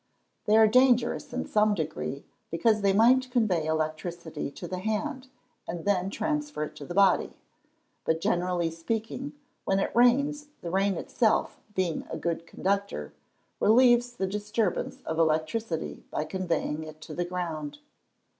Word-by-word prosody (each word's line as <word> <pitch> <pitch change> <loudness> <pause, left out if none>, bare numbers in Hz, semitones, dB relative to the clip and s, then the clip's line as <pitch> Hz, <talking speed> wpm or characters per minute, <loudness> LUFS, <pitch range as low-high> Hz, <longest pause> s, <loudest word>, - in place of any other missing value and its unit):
_ - - -48
They 215 +1 +5
are 220 - +8
dangerous 245 +1 +3
in 255 - -3
some 210 0 +3
degree, 155 -4 -4 0.2
because 210 +6 +2
they 200 -1 +4
might 250 +5 +4
convey 210 -11 +1
electricity 160 +1 -3
to 175 +5 -8
the 185 +1 -4
hand, 255 +7 -2 0.4
and 170 +1 -5
then 195 -2 +1
transfer 295 - -2
it 150 - -6
to 145 - -8
the 175 - -6
body. 195 -2 +3 0.7
But, 160 0 +1
generally 175 -1 0
speaking, 225 - -4 0.3
when 195 - +1
it 195 - -1
rains, 280 +5 +3
the 170 - -5
rain 195 +1 +2
itself, 220 +5 0
being 180 -3 -1
a - - -4
good 170 -1 -3
conductor, 195 - -2 0.5
relieves 240 +2 +5
the 195 -5 -2
disturbance 210 0 -2
of 160 0 -2
electricity 160 +3 0
by 150 - -2
conveying 165 -3 -2
it 155 0 -10
to 155 - -8
the 175 - -1
ground. 160 -5 -4
190 Hz, 150 wpm, -28 LUFS, 165-225 Hz, 0.7 s, are